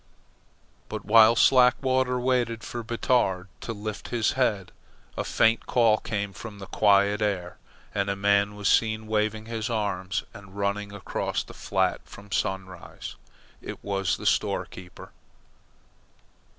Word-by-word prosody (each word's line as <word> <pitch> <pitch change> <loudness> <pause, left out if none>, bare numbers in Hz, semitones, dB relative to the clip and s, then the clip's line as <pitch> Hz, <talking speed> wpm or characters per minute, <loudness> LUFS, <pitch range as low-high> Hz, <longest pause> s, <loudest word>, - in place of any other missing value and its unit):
But 110 -2 -6
while 110 +2 +7
Slackwater 130 +1 +4
waited 120 -2 0
for 120 0 -5
Batard 115 -5 0
to - - -5
lift 110 0 -6
his 120 -3 +1
head, 105 -8 0 0.4
a - - -2
faint 115 +1 +2
call 115 -3 +3
came 100 -3 -3
from 105 +4 -9
the 100 - -8
quiet 100 +1 +3
air, 95 -4 -2 0.3
and 100 -1 -1
a 100 - 0
man 100 +1 +2
was 105 -1 -2
seen 110 -1 +2
waving 110 0 -1
his 115 0 -4
arms 100 -3 -2
and 100 -1 -13
running 100 0 -2
across 100 -2 -3
the - - -13
flat - - 0
from 100 0 -14
Sunrise. 95 -2 -4 0.5
It - - -8
was 95 -2 -1
the - - -9
store - - +1
keeper. 90 -1 -12
105 Hz, 135 wpm, -26 LUFS, 100-115 Hz, 0.5 s, while